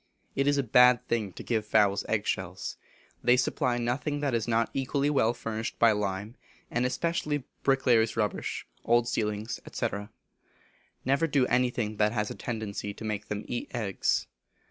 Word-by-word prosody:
It 140 +1 +1
is 145 0 +3
a 140 - +2
bad 125 +1 +5
thing 110 -4 0
to - - -8
give 110 -3 0
fowls 105 -2 +3
egg 110 -1 +1
shells. 95 0 -3 0.5
They 125 +1 +5
supply 125 0 +1
nothing 125 +5 -1
that 140 -3 0
is 115 -1 0
not 115 0 +1
equally 140 +2 0
well 115 -6 +3
furnished 110 -2 -4
by 115 -1 +6
lime, 105 +1 -2 0.4
and 120 +1 +1
especially 150 0 -1 0.2
bricklayers' 125 -5 +3
rubbish, 105 -2 -1 0.2
old 120 0 +3
ceilings, 105 -1 -2
&c. - - 0 1.2
Never 140 +5 +2
do 140 -4 +3
anything 120 -4 0
that 105 +1 +2
has 105 -2 -1
a - - -6
tendency 105 -3 -4
to 110 - -8
make 105 -2 -3
them 105 0 -4
eat 120 - -4
eggs. 105 -6 0
115 Hz, 165 wpm, -29 LUFS, 105-125 Hz, 1.2 s, by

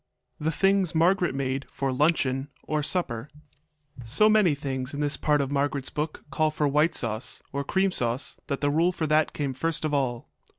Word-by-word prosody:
THE 155 - 0
THINGS 195 +1 +2
MARGARET 175 -2 +2
MADE 135 0 -2
FOR 135 -1 -2
LUNCHEON 135 -2 +1 0.2
OR 155 -1 -1
SUPPER 145 -6 -1 0.7
So 210 - +4
many 210 -8 +4
things 135 -1 -4
in - - -5
this 145 -1 0
part 150 +1 +1
of 140 0 -3
Margaret's 140 -1 -1
book 150 +1 -4
call 155 0 +2
for 150 -1 0
white 150 +4 +2
sauce, 115 +1 -2
or 140 0 -1
cream 190 +6 +1
sauce, 120 -4 -1
that 140 - -3
the 145 0 +2
rule 165 +4 +3
for 165 -3 -3
that 155 0 +2
came 140 -3 -3
first 160 +4 -1
of 150 - -1
all. 125 -4 -1
145 Hz, 185 wpm, -26 LUFS, 135-160 Hz, 0.7 s, So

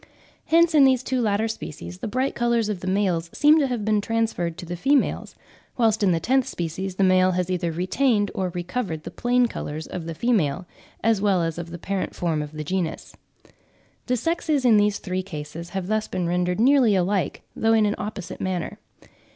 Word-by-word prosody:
Hence 335 +1 +4
in 295 -3 +6
these 260 -2 +4
two 260 -1 -1
latter 215 0 +1
species 90 - -7
the - - -4
bright 255 +5 -1
colours 235 -2 +1
of 205 -4 -2
the 185 - -7
males 185 -4 0
seem 300 +2 +5
to 280 - +2
have 240 -5 -3
been 215 -1 +2
transferred 220 -7 -1
to - - -7
the 175 +1 -5
females; 275 +9 +1 0.4
whilst 225 -3 +2
in 195 -3 +3
the 165 - +1
tenth 260 +8 +1
species 180 +3 -4
the 195 - +1
male 185 0 +4
has 180 0 -1
either 175 -2 -1
retained 205 +5 +1
or 185 -1 -1
recovered 175 -3 -3
the - - -7
plain 245 0 +2
colours 155 -8 -5
of 170 -2 -6
the 165 - -5
female, 185 - 0 0.4
as 220 -2 +2
well 195 -4 +2
as 165 0 -3
of 170 0 -6
the 170 - -7
parent 195 +2 -3
form 165 -3 -1
of 150 0 -7
the 155 0 -5
genus. 170 0 -3 0.9
The 250 -1 +1
sexes 315 -1 0
in 225 -3 +6
these 205 0 +2
three 185 0 -3
cases 165 -1 -7
have 190 -1 -4
thus 215 +2 -1
been 180 - -2
rendered 180 +2 0
nearly 250 -3 +5
alike, 190 0 0
though 225 0 +2
in 220 -1 +4
an 205 - +1
opposite 200 -3 -6
manner. 185 -3 -3
195 Hz, 200 wpm, -24 LUFS, 175-230 Hz, 0.9 s, in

